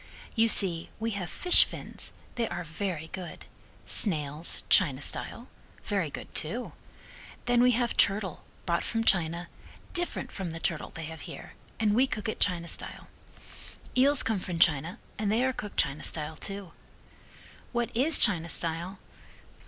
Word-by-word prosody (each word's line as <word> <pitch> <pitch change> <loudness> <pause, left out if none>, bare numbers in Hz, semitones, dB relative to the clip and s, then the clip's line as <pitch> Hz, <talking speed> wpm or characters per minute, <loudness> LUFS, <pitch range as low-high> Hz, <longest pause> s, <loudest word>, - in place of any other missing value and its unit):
"You 225 -1 +5
see, 180 -6 +2
we 225 +1 -1
have 190 -5 -3
fish 355 - +6
fins, - - -5 0.2
they 235 -2 0
are 175 0 -4
very 160 0 -4
good. 185 -2 -7 0.4
Snails, 155 -4 +2
China 140 -8 +5
style. 235 - -5 0.4
Very 195 -7 0
good, - - -8
too. 235 +11 -2 0.7
Then 245 0 +4
we 250 0 +5
have 240 0 0
turtle 195 -3 +2 0.2
brought 170 -1 +1
from 225 -1 -1
China, 175 -4 +2 0.5
different 350 0 -1
from 190 -3 -4
the 165 - -5
turtle 165 -1 -2
they 160 - -6
have 160 +1 -8
here, - - -9 0.3
and 215 -2 +3
we 255 +5 +4
cook 210 -5 -4
it 220 - -3
China 175 -3 +2
style. - - -2 0.9
Eels 275 +2 +5
come 220 -3 0
from 180 -2 -4
China 165 +4 +3 0.2
and 210 -1 +1
they 235 +4 +3
are 260 - +1
cooked 210 -4 -7
China 140 +2 +1
style, 155 0 -3
too. 195 -2 -5 1.0
What 240 -1 -2
is 280 +6 +4
China 170 -6 +4
style? 170 +4 -2
190 Hz, 155 wpm, -29 LUFS, 165-225 Hz, 1.0 s, fish